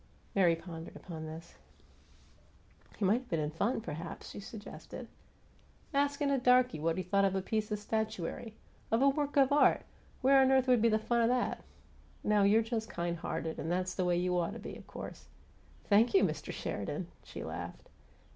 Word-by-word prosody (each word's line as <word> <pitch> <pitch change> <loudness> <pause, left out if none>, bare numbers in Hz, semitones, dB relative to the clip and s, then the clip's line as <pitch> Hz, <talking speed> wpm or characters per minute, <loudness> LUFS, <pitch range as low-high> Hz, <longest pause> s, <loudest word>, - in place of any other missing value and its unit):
Mary 175 -4 +4
pondered 165 -1 -9
upon 160 -3 -7
this. 160 +2 -10 1.4
"He 205 - 0
might 210 +6 +4
have 255 - -19
been 165 - 0
in 150 0 -1
fun, 205 +10 0
perhaps," 165 -1 -6
she - - -7
suggested. 205 +1 -9 0.9
"Askin' 285 0 +1
a 275 - +2
darky 250 -6 +4
what 165 +2 0
he 185 - -1
thought 200 +3 +2
of 195 -1 +2
a 190 - +1
piece 215 +1 -1
of 210 - 0
statuary 220 0 -3 0.3
of 225 +4 +3
a 280 - +7
work 290 +1 -1
of 275 0 +5
art! 290 - +5 0.4
Where 270 +1 +7
on 265 - +5
earth 265 0 +4
would 250 -3 +5
be 230 - +5
the 215 - +3
fun 235 +2 +1
of 230 - +4
that? 250 0 0 0.6
No, 210 -1 +3
you're 210 +3 +5
just 225 -1 -3
kind 170 0 -2
hearted 160 0 -4
and 165 - -2
that's 185 +1 0
the 185 - -1
way 175 -1 +2
you 180 0 +1
OUGHT 175 +3 -1
to 230 - -7
be, - - -7
of - - -12
course - - -8 0.3
" - - -28
"Thank 220 - +4
you, 390 - +6
Mr. - - -1
Sheridan!" - - -4
she - - -8
laughed. - - -7
210 Hz, 195 wpm, -32 LUFS, 175-245 Hz, 1.4 s, a